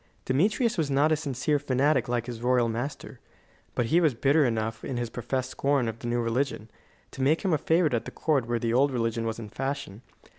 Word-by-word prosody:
Demetrius 205 - +1
was 150 -3 0
not 140 +3 +3
a - - +5
sincere 145 -1 -1
fanatic 135 -1 +1
like 120 -1 0
his 120 -2 -7
royal 125 -1 +3
master; 120 +5 -5 0.6
but 120 - +1
he 175 - +5
was 155 -7 +2
bitter 140 +6 +3
enough 110 -1 -2
in 130 - -4
his 120 -1 -3
professed 130 +2 -3
scorn 140 -3 +1
of 115 0 -5
the 120 - -6
new 120 0 0
religion, 115 -1 -2 0.4
to - - -7
make 150 +8 +2
him 185 - +2
a - - +4
favourite 165 -3 +2
at 115 - -1
the - - -5
court 140 -7 0
where 120 0 0
the 115 0 -1
old 135 +4 +4
religion 115 -2 -1
was 115 - -3
in 115 -2 -7
fashion. 135 -6 -4
130 Hz, 220 wpm, -27 LUFS, 115-145 Hz, 0.6 s, a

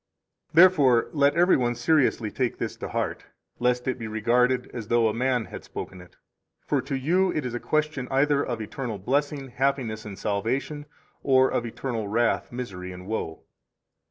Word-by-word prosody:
41 170 - +10
Therefore 140 -10 +4
let 145 -1 +3
every 175 +2 +5
one 120 -1 0
seriously 120 -4 +2
take 125 -3 -1
this - - -4
to - - -6
heart, - - -3 0.3
lest 125 0 +1
it 130 - -1
be 115 - -5
regarded 125 +4 +2
as 115 -4 -6
though 120 -1 +3
a 110 - 0
man 125 0 0
had - - -9
spoken 90 - -8
it. 90 - -17 0.5
For 140 -3 +1
to 135 +2 -4
you 180 +8 +2
it 150 -5 -2
is 125 - -3
a 120 - -2
question 155 -3 -1
either 140 +1 +2
of 120 -3 -3
eternal 115 0 -5
blessing, 140 +6 -1
happiness, 125 -4 -1
and 100 -3 -8
salvation, 130 +8 -2 0.3
or 130 -1 +4
of 120 - -1
eternal 115 -2 -4
wrath, 115 +3 0
misery, 95 -7 -6
and 90 0 -10
woe. 95 -6 -4
125 Hz, 180 wpm, -26 LUFS, 110-140 Hz, 0.5 s, 41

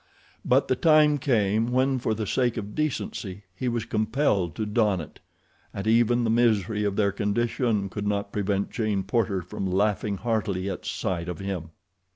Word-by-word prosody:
But - - +3
the 130 - +2
time 150 0 +4
came 110 -4 +1
when 130 +1 +2
for 110 -2 -1
the 110 0 -3
sake 120 +3 0
of 105 -1 -5
decency 105 -9 -3
he 125 - -3
was 115 -2 -1
compelled 110 - 0
to 110 - -2
don 105 -3 +1
it, 80 - -9 0.6
and 100 - -4
even 120 +2 +3
the 115 - +1
misery 110 -3 +2
of 100 -1 0
their 100 -1 +2
condition 105 +1 0
could 105 +1 -4
not 100 -1 -1
prevent 100 -1 -1
Jane 110 -5 -1
Porter 100 -2 0
from 95 +2 -4
laughing 100 +1 +1
heartily 105 -4 -1
at 95 - -7
sight 85 -1 -2
of 90 - -4
him. 95 -4 -4
105 Hz, 175 wpm, -26 LUFS, 100-120 Hz, 0.6 s, time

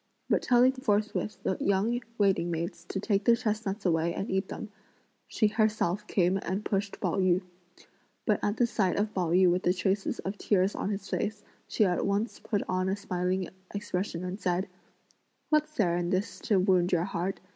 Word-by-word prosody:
But - - +4
telling 250 +1 +5
forthwith 215 -4 -1
the 185 - 0
young 210 +5 +1 0.2
waiting 195 -4 +2
maids 170 0 -4
to 195 - -4
take 200 0 +1
the 235 0 +5
chestnuts 215 -3 -2
away 170 -1 +1
and 195 - -3
eat 190 +1 0
them, 210 - -7 0.6
she 220 - +1
herself 210 -2 +1
came 185 0 +2
and 190 +4 -3
pushed 200 0 -2
Pao 185 -1 0
yü; 185 0 +3 0.8
but - - +2
at 205 +1 0
the 240 - +4
sight 200 -6 0
of 210 +1 0
Pao 180 -4 0
yü 180 +2 +5
with 180 +1 +1
the 180 0 +2
traces 190 +2 0
of 195 +2 -5
tears 195 -1 +2
on - - -3
his 195 -1 -4
face, 210 0 -2 0.2
she 215 - +2
at 180 -2 +1
once 200 +3 -1
put 205 -3 -1
on 185 0 0
a 190 - +1
smiling 185 -1 -2 0.3
expression 190 -4 -3
and 185 +3 -4
said: 180 0 0 0.8
"What's 305 0 +2
there 180 - +2
in 175 0 -1
this 190 +4 -1
to 210 -4 +3
wound 185 -1 +3
your 175 -2 +2
heart? 185 0 -3
195 Hz, 190 wpm, -29 LUFS, 180-210 Hz, 0.8 s, telling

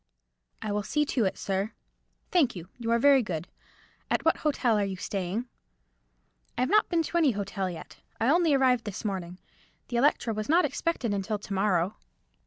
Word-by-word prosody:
"I 215 - -2
will 210 0 0
see 295 +9 0
to 245 -6 0
it, 190 - -1
sir." 195 +2 -2 0.6
"Thank 300 - +3
you; 175 0 -8
you 230 -1 -3
are 235 - +4
very 275 +2 +6
good. 175 -6 -4 0.6
At - - 0
what 325 - +4
hotel 265 -6 +1
are - - +2
you 195 -1 -2
staying?" 195 +4 -3 1.1
"I - - 0
have 255 - +1
not 425 0 +4
been 335 -2 +2
to 345 - -2
any 295 -7 +4
hotel 195 -2 -3
yet. 170 - -9 0.2
I 225 - +1
only 330 -3 +4
arrived 255 -3 +3
this 210 +1 -6
morning. 180 -3 -3 0.5
The 240 - -1
Electra 240 -3 +2
was 215 +2 -4
not 335 +1 +5
expected 275 -5 -1
until 200 +2 -1
to 205 0 -7
morrow." 190 -1 +1
220 Hz, 190 wpm, -28 LUFS, 195-275 Hz, 1.1 s, very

